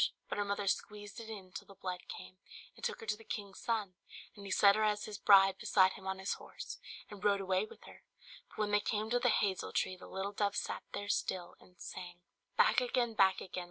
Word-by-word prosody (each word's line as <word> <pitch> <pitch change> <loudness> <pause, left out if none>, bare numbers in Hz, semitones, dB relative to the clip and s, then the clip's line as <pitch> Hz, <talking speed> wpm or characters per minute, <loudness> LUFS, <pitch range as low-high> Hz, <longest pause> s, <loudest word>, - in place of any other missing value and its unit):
But - - -2
her 205 - +1
mother 200 0 -1
squeezed 205 +1 -2
it 225 -1 -8
in 195 -4 -8
till - - -8
the 195 - -13
blood 180 -1 -5
came, 185 - -9 0.4
and - - -16
took 475 -1 -2
her - - -7
to 210 - 0
the 225 - -15
king's 200 -3 -5
son; 215 -5 -1 0.4
and 205 - -11
he 200 - -7
set 200 0 +6
her 215 - +2
as 210 -1 +1
his 210 -1 -6
bride 195 -1 +7
beside 190 -2 +5
him 190 - -10
on 190 0 -1
his 190 +1 -1
horse, - - -8 0.3
and 205 -2 -9
rode 200 -1 +4
away 190 +1 +1
with - - -15
her. - - -13 0.5
But - - -17
when 210 -1 0
they 205 - +5
came 215 +1 -1
to 245 - +3
the 245 0 +3
hazel 195 -4 +1
tree 185 - 0
the 180 - -12
little 195 +1 -3
dove 205 0 0
sat - - -2
there 205 - -4
still, 180 -3 -1
and 180 0 -21
sang 175 -1 -8 0.4
"Back - - +5
again! 245 -1 +1
back 195 -3 +4
again! 185 0 -5
200 Hz, 235 wpm, -34 LUFS, 190-215 Hz, 0.5 s, bride